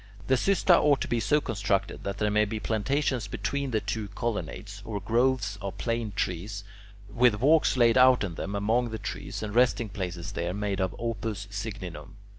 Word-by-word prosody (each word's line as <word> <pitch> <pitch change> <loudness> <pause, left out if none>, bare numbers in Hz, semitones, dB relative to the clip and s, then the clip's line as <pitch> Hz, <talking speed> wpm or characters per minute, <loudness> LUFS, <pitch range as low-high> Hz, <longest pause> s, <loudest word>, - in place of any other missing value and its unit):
The 130 - +1
"xysta" 180 +5 +4
ought 145 -2 +4
to - - -1
be 120 - 0
so 150 +6 +3
constructed 100 -6 -1
that 100 0 -3
there 105 0 +1
may 105 +1 +3
be 110 +1 -4
plantations 120 +4 0
between 140 0 -2
the 110 -3 +1
two 105 +1 -3
colonnades, 100 -1 -4
or 105 -1 -4
groves 115 0 +1
of 100 0 -5
plane 115 -2 -2
trees, 100 +2 -3 0.4
with 110 0 +3
walks 150 +2 +4
laid 120 0 +5
out 130 -2 +6
in 95 -4 -3
them 100 +4 -4
among 115 +4 +1
the 110 - -4
trees 95 0 -5
and 105 -1 -4
resting 120 -2 +3
places 90 -4 -5
there, 85 +2 -3
made 100 -1 -2
of 95 -1 -1
"opus 110 -3 -3
signinum." 100 -3 -6
105 Hz, 185 wpm, -28 LUFS, 100-120 Hz, 0.4 s, out